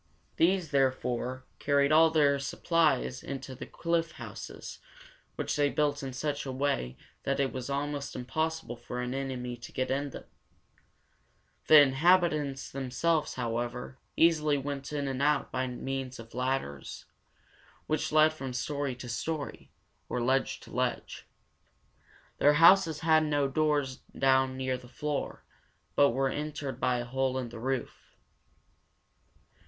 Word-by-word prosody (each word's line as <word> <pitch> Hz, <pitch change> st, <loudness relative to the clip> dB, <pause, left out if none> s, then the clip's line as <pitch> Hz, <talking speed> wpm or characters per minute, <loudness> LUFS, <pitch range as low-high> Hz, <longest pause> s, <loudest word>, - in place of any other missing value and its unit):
These, 175 Hz, -1 st, +2 dB
therefore, 130 Hz, -2 st, 0 dB
carried 140 Hz, 0 st, +2 dB
all 160 Hz, +1 st, +7 dB
their 145 Hz, -3 st, +3 dB
supplies 140 Hz, -, +1 dB
into 135 Hz, -1 st, -6 dB
the 130 Hz, -, -8 dB
cliff 170 Hz, -1 st, -1 dB
houses, -, -, -8 dB, 0.6 s
which -, -, -2 dB
they 145 Hz, -1 st, +3 dB
built 145 Hz, 0 st, 0 dB
in 135 Hz, -1 st, -4 dB
such 145 Hz, +2 st, -2 dB
a 135 Hz, -, -4 dB
way 130 Hz, -, -1 dB, 0.2 s
that 140 Hz, 0 st, -1 dB
it 135 Hz, -1 st, +1 dB
was 130 Hz, 0 st, -5 dB
almost 140 Hz, 0 st, -3 dB
impossible 155 Hz, +2 st, -2 dB
for 120 Hz, +1 st, -7 dB
an 125 Hz, 0 st, -2 dB
enemy 130 Hz, -2 st, -3 dB
to 120 Hz, -, -10 dB
get 130 Hz, 0 st, -2 dB
in 140 Hz, +2 st, -1 dB
them. -, -, -9 dB, 1.4 s
The 155 Hz, -, +10 dB
inhabitants 150 Hz, -1 st, +2 dB
themselves, 145 Hz, +4 st, 0 dB
however, 120 Hz, +2 st, -3 dB, 0.2 s
easily 155 Hz, -3 st, +4 dB
went 140 Hz, 0 st, -5 dB
in 145 Hz, -2 st, -2 dB
and 135 Hz, 0 st, -2 dB
out 145 Hz, 0 st, +2 dB
by 130 Hz, 0 st, -1 dB
means 130 Hz, +1 st, -4 dB
of 115 Hz, 0 st, -12 dB
ladders, 125 Hz, -, -3 dB, 0.8 s
which 155 Hz, -1 st, -1 dB
led 155 Hz, 0 st, +5 dB
from 135 Hz, -4 st, -6 dB
story 140 Hz, +1 st, -2 dB
to 125 Hz, 0 st, -9 dB
story, 145 Hz, +5 st, -4 dB, 0.4 s
or -, -, -2 dB
from 120 Hz, -, 0 dB
ledge 135 Hz, +2 st, +1 dB
to -, -, -14 dB
ledge. -, -, -2 dB, 1.1 s
Their 145 Hz, -, +6 dB
houses 165 Hz, 0 st, +6 dB
had 160 Hz, -1 st, +4 dB
no 145 Hz, -2 st, +1 dB
doors 145 Hz, -2 st, 0 dB, 0.2 s
down 130 Hz, -1 st, +3 dB
near 130 Hz, -1 st, -1 dB
the 125 Hz, -, -14 dB
floor, 150 Hz, +2 st, -4 dB, 0.5 s
but 140 Hz, -, +6 dB
were 135 Hz, +3 st, +1 dB
entered 145 Hz, -3 st, -4 dB
by 125 Hz, -1 st, +1 dB
a 120 Hz, -, -3 dB
hole 130 Hz, +1 st, -1 dB
in 125 Hz, -2 st, -3 dB
the 115 Hz, -1 st, -9 dB
roof. 130 Hz, +2 st, -4 dB
135 Hz, 145 wpm, -30 LUFS, 130-150 Hz, 1.4 s, The